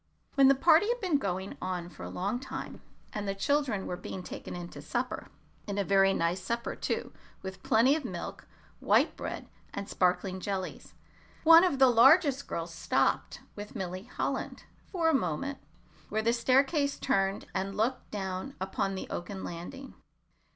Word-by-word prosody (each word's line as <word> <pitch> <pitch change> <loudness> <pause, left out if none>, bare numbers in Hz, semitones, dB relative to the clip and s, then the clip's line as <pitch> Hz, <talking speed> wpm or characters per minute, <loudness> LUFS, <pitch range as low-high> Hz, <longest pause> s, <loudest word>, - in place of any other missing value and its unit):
When 275 -1 +6
the 275 - +6
party 325 +7 +5
had 485 +1 0
been 360 -9 +1
going 190 -3 -3
on 180 -2 -3
for - - -14
a - - -5
long 200 +6 -2
time, 265 - -7 0.3
and 205 -1 -3
the 195 - -1
children 245 -2 0
were 180 - -3
being 185 +1 -7
taken - - -7
in 175 -1 -6
to - - -10
supper - - -3 0.4
and 200 -1 -3
a 200 - +2
very 195 0 +4
nice 175 0 0
supper, 235 +5 -3
too, - - -3 0.3
with 190 0 -7
plenty 245 +6 +4
of 315 - -3
milk, - - -6 0.3
white - - +3
bread, - - -5 0.3
and 200 0 -4
sparkling 185 +1 +1
jellies 190 -1 -5 0.5
one 330 +1 +9
of 355 -7 +2
the 265 - +7
largest 275 +4 +5
girls 165 0 -4
stopped 165 - 0
with 205 0 -8
Milly 185 +1 -4
Holland - - -3 0.2
for 340 -4 0
a 325 - +4
moment 265 - -1 0.5
where 220 0 -1
the 230 +1 +3
staircase 275 +4 +2
turned 195 -7 0
and 195 +1 -2
looked 245 +4 0
down 190 +4 -4
upon 195 +1 -1
the 190 - -5
oaken 190 +2 -5
landing. 265 +11 -7
205 Hz, 170 wpm, -30 LUFS, 190-275 Hz, 0.5 s, one